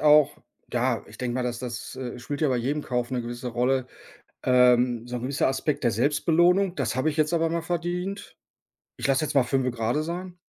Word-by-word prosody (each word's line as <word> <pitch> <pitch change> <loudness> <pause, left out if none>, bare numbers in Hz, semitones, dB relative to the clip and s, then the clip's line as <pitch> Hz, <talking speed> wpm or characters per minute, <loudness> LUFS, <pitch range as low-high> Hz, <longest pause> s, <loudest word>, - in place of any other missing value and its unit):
auch, 150 -1 +5 0.4
ja, - - 0
ich - - -14
denke 125 -1 -2
mal, 130 - 0
dass 120 -1 -2
das, 125 0 -6
äh, 125 -2 -5
spielt 145 +5 -5
ja 150 - +3
bei 125 - +1
jedem 140 +5 -1
Kauf 125 0 -2
'ne 125 -2 -1
gewisse 120 +1 -5
Rolle, 125 +2 +1 0.6
ähm, 125 -1 +4
so 125 0 -4
'n 120 - -5
gewisser 135 +1 +1
Aspekt 135 +1 -1
der 120 - +4
Selbstbelohnung: 170 - +3
„Das - - -1
habe 135 +5 +2
ich 150 - -7
jetzt 155 +2 +2
aber 165 -1 +2
mal 170 0 -1
verdient. 180 +4 -3 0.6
Ich - - -2
lasse 135 +3 +2
jetzt 150 - -3
mal 135 - +5
fünfe 130 0 +1
gerade 120 +5 -1
sein“? 180 +2 -5
135 Hz, 210 wpm, -26 LUFS, 125-155 Hz, 0.6 s, auch